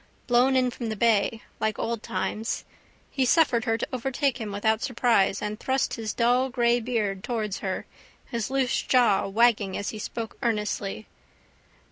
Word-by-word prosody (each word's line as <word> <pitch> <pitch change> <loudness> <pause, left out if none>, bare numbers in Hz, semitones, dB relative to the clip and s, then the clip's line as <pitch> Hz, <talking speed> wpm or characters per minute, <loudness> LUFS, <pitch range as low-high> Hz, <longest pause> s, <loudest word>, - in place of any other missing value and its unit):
Blown 250 +2 +3
in 255 -1 +3
from 235 -1 -5
the 220 - -2
bay. 220 0 +2 0.2
Like 215 -1 0
old 230 -1 -2
times. 220 +2 -3 0.5
He 270 - +1
suffered 255 -4 +3
her 225 -2 +1
to - - -3
overtake 260 +1 -1
him 215 -2 -4
without 220 +2 +1
surprise 235 -6 +2
and 210 +1 -3
thrust 265 +1 0
his 220 -3 -3
dull 245 +2 +2
grey 240 -1 +2
beard 215 -5 -2
towards 215 -5 -2
her, 190 -1 -3 0.4
his 235 -4 -3
loose 265 -2 +1
jaw 245 -7 +3
wagging 210 -2 +2
as 200 - -3
he 215 - -6
spoke 225 +1 -6
earnestly. 210 -3 -2
230 Hz, 160 wpm, -26 LUFS, 210-245 Hz, 0.5 s, Blown